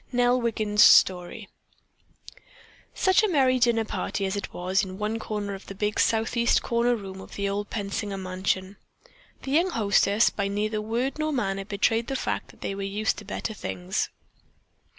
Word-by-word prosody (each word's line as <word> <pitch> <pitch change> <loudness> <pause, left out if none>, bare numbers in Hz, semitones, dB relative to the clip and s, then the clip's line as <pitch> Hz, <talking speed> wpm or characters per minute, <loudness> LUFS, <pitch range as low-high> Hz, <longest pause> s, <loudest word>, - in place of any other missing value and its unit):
NELL 245 0 +2
WIGGIN'S 215 -3 +1
STORY 180 -2 +4 1.5
Such 375 +1 +4
a 435 - +2
merry 265 -7 +3
dinner 235 -2 +2
party 200 - -3
as 190 +1 -2
it 200 - -4
was 185 +3 0
in 190 -1 -6
one 215 +2 -2
corner 205 -2 -4
of 195 - -10
the 195 - -8
big 210 +2 -1
southeast 230 +1 +2
corner 235 +1 +1
room 190 -3 -8
of - - -12
the 200 0 -1
old 205 +1 -3
Pensinger 200 -1 -3
mansion. 190 +1 -2 0.7
The 270 - -4
young 335 +6 +3
hostesses 205 - +3
by 200 -1 -2
neither 210 +2 -1
word 240 +7 -2
nor 310 0 0
manner 195 -7 -2
betrayed 215 +3 0
the 270 - -3
fact - - -2
that - - -19
they - - -3
were 195 - -5
used 200 +2 -1
to 210 - -12
better 215 +2 -4
things. 185 -2 -3
210 Hz, 170 wpm, -26 LUFS, 195-235 Hz, 1.5 s, STORY